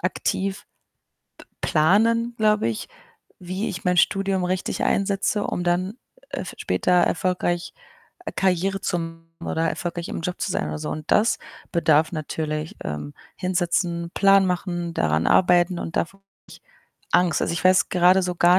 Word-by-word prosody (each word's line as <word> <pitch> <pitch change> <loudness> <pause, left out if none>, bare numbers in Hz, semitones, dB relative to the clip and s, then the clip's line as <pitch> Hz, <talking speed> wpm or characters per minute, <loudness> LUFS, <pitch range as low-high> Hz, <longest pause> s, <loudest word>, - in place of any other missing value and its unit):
aktiv 190 +1 -2 0.7
p - - -13 0.2
planen, 225 +9 +3
glaube 210 - +3
ich, 115 - -4 0.5
wie 185 +3 -4
ich 185 - -6
mein 180 0 +2
Studium 195 0 +2
richtig 185 +1 -2
einsetze, 200 +1 0
um 175 - -2
dann, 180 +3 0 0.4
äh, - - -4
f - - -7
später 180 - 0
erfolgreich 175 0 +1 0.6
Karriere 190 +1 +1
zu 180 -2 -1
machen 165 0 -7 0.2
oder 165 +1 0
erfolgreich 170 +1 -4
im - - -4
Job 180 +2 -4
zu - - -1
sein - - -1
oder 75 0 -4
so. - - -4
Und 155 -1 -5
das 220 +3 +3 0.3
bedarf 160 -2 +3
natürlich, 155 0 -4
ähm, 75 -1 -5 0.2
hinsetzen, 175 -1 -1
Plan 195 -1 +5
machen, 175 -2 -2
daran 80 - +1
arbeiten, 175 0 +4
und 165 - -6
davor 195 +4 -2
habe 195 - -51 0.2
ich - - -14 0.5
Angst. 175 -4 +3
Also, - - 0
ich 165 -1 -3
weiß 185 0 +5
gerade 180 +1 +4
so 180 -1 -2
gar 175 +2 +5
180 Hz, 160 wpm, -23 LUFS, 165-190 Hz, 0.7 s, Plan